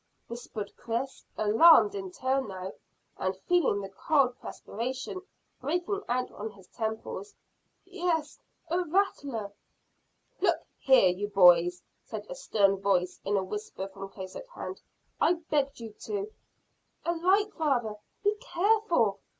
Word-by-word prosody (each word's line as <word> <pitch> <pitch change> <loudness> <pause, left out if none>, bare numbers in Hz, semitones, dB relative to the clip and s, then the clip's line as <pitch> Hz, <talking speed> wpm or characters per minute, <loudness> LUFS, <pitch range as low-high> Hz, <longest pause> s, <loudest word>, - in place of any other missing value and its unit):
whispered 230 -3 -6
Chris, 240 +4 -3
alarmed 320 - +7
in 385 -2 -4
turn 265 -4 0
now, 190 -1 -6 0.5
and 185 0 -1
feeling 340 -13 +3
the 195 - -6
cold 260 +4 +2
perspiration 260 - -5 0.4
breaking 355 +8 -1
out 250 +1 0
on 215 +2 -5
his 200 -3 -16
temples. 220 - -4 0.5
"Yes 350 -5 -1 0.3
a 350 - +2
rattler." 295 - 0 0.9
"Look 350 -3 +3 0.2
here, 260 -9 +6
you 190 +3 -2
boys," 180 -3 +5 0.2
said - - -6
a - - -2
stern 205 - +2
voice, 185 -2 +1
in 200 +1 +1
a 190 - +1
whisper 200 0 -5
from 195 0 -8
close 190 -1 -8
at - - -8
hand, - - -7 0.4
"I - - +5
begged 290 -5 -1
you 225 -2 -8
to 410 0 -3 0.4
" - - -41
"A 340 - +2
light, 385 +5 +2
father! 245 -9 0 0.3
Be 410 0 +4
careful!" 350 - +2
255 Hz, 135 wpm, -29 LUFS, -, 0.9 s, alarmed